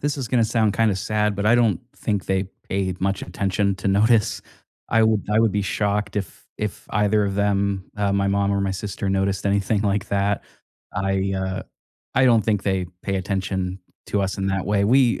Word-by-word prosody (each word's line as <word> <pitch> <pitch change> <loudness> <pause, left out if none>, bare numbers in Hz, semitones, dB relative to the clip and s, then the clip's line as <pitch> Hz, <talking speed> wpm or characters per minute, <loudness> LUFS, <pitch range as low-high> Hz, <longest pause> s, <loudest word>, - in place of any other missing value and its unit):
this 145 0 -1
is 130 -4 -4
gonna 120 -3 +3
sound 110 -2 +1
kinda 110 -3 +3
sad, 105 +1 0
but, 100 +1 -1
I 115 - +6
don't 115 -7 +3 0.2
think 105 -3 -2
they 95 0 +1 0.2
paid 95 -2 -2
much 95 0 0
attention 100 0 0
to 95 +2 -2
notice. 105 +2 +3 0.5
I 115 -1 +3
wo 110 -1 +4
I 105 - +4
would 115 -3 +3
be 100 -1 0
shocked 105 +2 -1
if 100 -2 -5
if 105 -2 -4
either 105 0 +2
of 100 -1 -2
them, 100 -1 0
uh, 100 -1 +1
my 100 0 +1
mom 100 0 +1
or 100 - +1
my 100 0 0
sister, 100 +1 -4
noticed 95 0 0
anything 100 +1 +1
like 100 0 0
that. 100 0 0 0.5
I, 95 0 0
uh 95 0 -2 0.5
I 130 - +4
don't 115 -3 +5
think 105 -3 +1
they 95 -2 0 0.2
pay 100 -1 -1
attention 95 -1 -2 0.3
to 100 - 0
us 95 0 -2
in 95 - -1
that 95 -1 -1
way. 100 0 +2
We, 125 +2 +4
100 Hz, 200 wpm, -23 LUFS, 95-105 Hz, 0.5 s, I